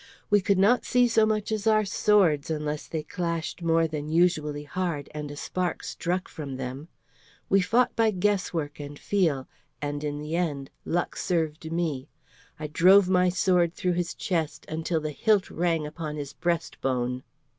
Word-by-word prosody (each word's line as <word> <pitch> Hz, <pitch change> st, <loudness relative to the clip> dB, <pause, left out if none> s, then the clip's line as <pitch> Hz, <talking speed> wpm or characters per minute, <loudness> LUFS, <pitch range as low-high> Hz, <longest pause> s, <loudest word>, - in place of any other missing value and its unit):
We 205 Hz, -1 st, +5 dB
could 200 Hz, 0 st, +2 dB
not 210 Hz, +6 st, +4 dB
see 250 Hz, 0 st, +3 dB
so 225 Hz, -2 st, +3 dB
much 215 Hz, 0 st, -1 dB
as 215 Hz, -1 st, -1 dB
our 215 Hz, -1 st, +4 dB
swords 185 Hz, -7 st, +3 dB
unless 150 Hz, -1 st, -3 dB
they 160 Hz, -2 st, -3 dB
clashed 170 Hz, +1 st, -3 dB
more 165 Hz, -1 st, +3 dB
than 150 Hz, -1 st, -5 dB
usually 155 Hz, -3 st, +1 dB
hard, 150 Hz, 0 st, -3 dB
and 150 Hz, -1 st, -5 dB
a 145 Hz, -, -7 dB
spark 180 Hz, +4 st, -3 dB
struck 180 Hz, +2 st, -2 dB
from 140 Hz, -5 st, -7 dB
them. 130 Hz, +4 st, -6 dB, 0.6 s
We 195 Hz, 0 st, +5 dB
fought 240 Hz, +6 st, +2 dB
by 225 Hz, -1 st, +3 dB
guesswork 180 Hz, -7 st, -1 dB
and 145 Hz, 0 st, -7 dB
feel, 160 Hz, -10 st, 0 dB, 0.3 s
and 145 Hz, +1 st, -3 dB
in 145 Hz, -1 st, -2 dB
the 150 Hz, +2 st, -4 dB
end 145 Hz, -6 st, -2 dB
luck 175 Hz, +1 st, -1 dB
served 160 Hz, -2 st, -2 dB
me. 160 Hz, -6 st, -2 dB, 0.5 s
I 155 Hz, -, -4 dB
drove 180 Hz, +5 st, +5 dB
my 180 Hz, -1 st, +4 dB
sword 180 Hz, -2 st, +2 dB
through 180 Hz, -1 st, 0 dB
his 175 Hz, -1 st, -2 dB
chest 165 Hz, -5 st, -2 dB
until 160 Hz, +1 st, -2 dB
the 155 Hz, 0 st, -3 dB
hilt 205 Hz, -, +2 dB
rang 165 Hz, -2 st, 0 dB
upon 150 Hz, 0 st, -5 dB
his 145 Hz, -2 st, -6 dB
breast 170 Hz, -1 st, -2 dB
bone." 125 Hz, -1 st, -1 dB
165 Hz, 170 wpm, -27 LUFS, 150-185 Hz, 0.6 s, We